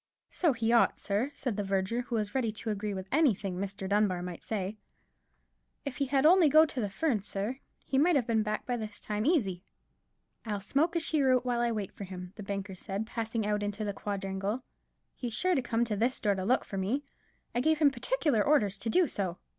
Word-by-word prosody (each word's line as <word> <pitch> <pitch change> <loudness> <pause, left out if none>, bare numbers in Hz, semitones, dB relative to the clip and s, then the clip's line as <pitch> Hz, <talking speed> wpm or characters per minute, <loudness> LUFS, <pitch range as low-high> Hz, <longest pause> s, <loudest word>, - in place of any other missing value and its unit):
"So 340 -4 +2
he 230 -1 0
ought, 235 - +4
sir," 210 +6 -1
said 255 -6 -2
the 205 - 0
verger, 195 +4 0
who 240 -1 -4
was 210 -2 -1
ready 245 -5 +1
to 220 +1 -4
agree 210 0 -2
to 190 -1 -4
anything 215 - +2
Mr. 195 0 -4
Dunbar 200 -3 +2
might 180 -2 -6
say; 210 0 -3 1.1
"if 280 - -4
he 280 - +1
had 270 +1 +2
only 340 -1 +7
to - - -6
go 315 +1 +8
to 260 -5 -4
the 205 - -1
Ferns, 210 0 -1
sir, 210 +7 -3 0.3
he 265 - +1
might 335 +3 +4
have 260 -5 +2
been 225 -2 +2
back 215 0 -2
by 245 - -1
this 215 -2 -6
time 210 +3 -2
easy." 200 - +2 0.8
"I'll 210 -3 -2
smoke 285 - +1
a - - +3
cheroot 270 -6 +2
while 245 -1 0
I 240 0 +2
wait 210 -4 -3
for 200 - -7
him," 180 -1 -8
the - - -8
banker 195 -1 -4
said, 195 +3 -4
passing 225 -1 -2
out 210 0 0
into 205 +1 -2
the 205 - -2
quadrangle; 195 +3 -3 0.5
"he's 240 -3 -4
sure 370 +9 +2
to 270 - +2
come 235 -1 0
to 220 -2 -2
this 235 +5 +1
door 205 -2 +2
to 190 -1 -3
look 250 +5 +2
for 195 - -4
me—I 245 +2 -4
gave 315 +3 +3
him 295 -2 +5
particular 270 - +1
orders 205 -9 +2
to 225 - -2
do 360 +10 +4
so." 185 -7 -3
220 Hz, 220 wpm, -30 LUFS, 200-260 Hz, 1.1 s, go